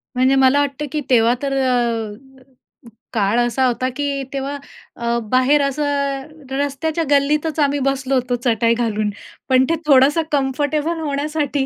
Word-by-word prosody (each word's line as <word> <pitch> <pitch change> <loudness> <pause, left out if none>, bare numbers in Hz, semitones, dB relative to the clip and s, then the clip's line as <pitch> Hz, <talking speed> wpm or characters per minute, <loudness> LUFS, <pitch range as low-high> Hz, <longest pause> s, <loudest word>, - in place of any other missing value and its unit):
म्हणजे 260 +2 +3
मला 265 +1 +4
वाटतं 285 +1 -2
की 300 - -2
तेव्हा 235 -2 +4
तर 280 -1 -2
अ, 240 -5 0 1.0
काळ 215 +1 +1
असा 240 +2 +1
होता, 255 +1 0
की 280 -1 -2
तेव्हा 275 +1 -3 0.4
अ, 235 0 -1
बाहेर 260 +4 +3
असं, 275 +2 -1 0.7
रस्त्याच्या 285 +4 -1
गल्लीतच 295 +2 +1
आम्ही 285 -1 +2
बसलो 270 0 0
होतो, 250 -1 0
चटाई 230 -1 +2
घालून. 215 -3 -1 0.4
पण 260 0 +5
ते 330 - +2
थोडंसं 280 +3 +5
कम्फर्टेबल 290 +4 0
होण्यासाठी 290 -1 -1
270 Hz, 140 wpm, -19 LUFS, 250-290 Hz, 1.0 s, पण